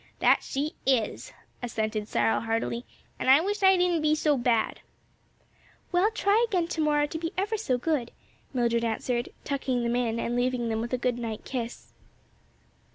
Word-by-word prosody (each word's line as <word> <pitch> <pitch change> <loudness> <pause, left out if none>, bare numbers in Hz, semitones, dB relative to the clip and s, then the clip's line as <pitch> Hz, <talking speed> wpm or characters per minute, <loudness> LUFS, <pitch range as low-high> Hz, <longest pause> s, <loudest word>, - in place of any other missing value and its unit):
"That - - +4
she 290 +3 -3
is!" 265 - 0 0.3
assented 215 -3 -2
Cyril, 225 - +2
heartily, 230 +1 -2 0.3
"an' - - -3
I 270 +2 +8
wish 405 +5 -2
I 380 -1 +6
didn't 355 -2 +2
be 305 0 +3
so 305 -1 +2
bad." 240 -3 +1 1.1
"Well, 365 +4 +3
try 435 0 +2
again 360 -6 0
to 320 - -2
morrow 295 -1 +3
to 320 +2 -5
be 330 0 -3
ever 410 +4 0
so 335 - 0
good," 255 -3 -1 0.4
Mildred 235 -2 +1
answered, 240 +2 -1
tucking 265 -3 -1
them 235 0 0
in 230 -2 0
and 235 - -1
leaving 245 -1 0
them 220 0 -1
with 235 - -4
a - - +2
good 245 -1 -1
night 225 -2 -5
kiss. 240 -3 -5
255 Hz, 170 wpm, -27 LUFS, 235-325 Hz, 1.1 s, I